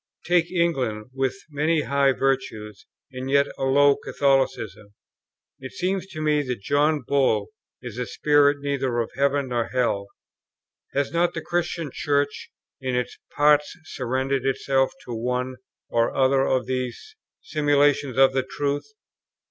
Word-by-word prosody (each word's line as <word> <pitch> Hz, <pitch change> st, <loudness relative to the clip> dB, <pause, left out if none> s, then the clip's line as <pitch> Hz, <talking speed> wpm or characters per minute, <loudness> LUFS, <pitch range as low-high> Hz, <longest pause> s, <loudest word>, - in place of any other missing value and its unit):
Take 175 Hz, -1 st, +2 dB
England 130 Hz, -11 st, -1 dB
with 135 Hz, 0 st, -1 dB, 0.2 s
many 155 Hz, +2 st, +1 dB
high 140 Hz, -1 st, +2 dB
virtues, 110 Hz, -7 st, -2 dB, 0.2 s
and 130 Hz, 0 st, -6 dB
yet 140 Hz, +1 st, +4 dB
a 135 Hz, -, -2 dB
low 140 Hz, +1 st, +5 dB
Catholicism. 130 Hz, -7 st, -1 dB, 0.6 s
It 130 Hz, 0 st, -9 dB
seems 190 Hz, +1 st, -2 dB
to 155 Hz, -5 st, -7 dB
me 150 Hz, -1 st, +2 dB
that 125 Hz, -7 st, -4 dB
John 145 Hz, +2 st, +2 dB
Bull 130 Hz, -7 st, +2 dB, 0.3 s
is 120 Hz, -1 st, -7 dB
a 125 Hz, -, -2 dB
spirit 145 Hz, -1 st, +3 dB
neither 135 Hz, -3 st, -1 dB
of 115 Hz, -1 st, -1 dB
heaven 140 Hz, -1 st, +1 dB
nor 120 Hz, -2 st, 0 dB
hell.... 115 Hz, -6 st, 0 dB, 0.9 s
Has 140 Hz, 0 st, 0 dB
not 170 Hz, +1 st, +1 dB
the -, -, -3 dB
Christian 170 Hz, -3 st, -2 dB
Church, 145 Hz, -2 st, -1 dB, 0.3 s
in 130 Hz, -1 st, -2 dB
its 125 Hz, 0 st, -3 dB, 0.2 s
parts, 150 Hz, +3 st, +3 dB
surrendered 130 Hz, -1 st, -2 dB
itself 135 Hz, 0 st, +1 dB
to 120 Hz, -, -6 dB
one 125 Hz, +2 st, -2 dB, 0.3 s
or 115 Hz, 0 st, 0 dB
other 135 Hz, 0 st, +3 dB
of 130 Hz, -2 st, +1 dB
these 130 Hz, -1 st, -4 dB, 0.3 s
simulations 145 Hz, -3 st, +2 dB
of 135 Hz, 0 st, +6 dB
the 135 Hz, -, +2 dB
truth?... 140 Hz, +2 st, -3 dB
135 Hz, 140 wpm, -24 LUFS, 125-145 Hz, 0.9 s, of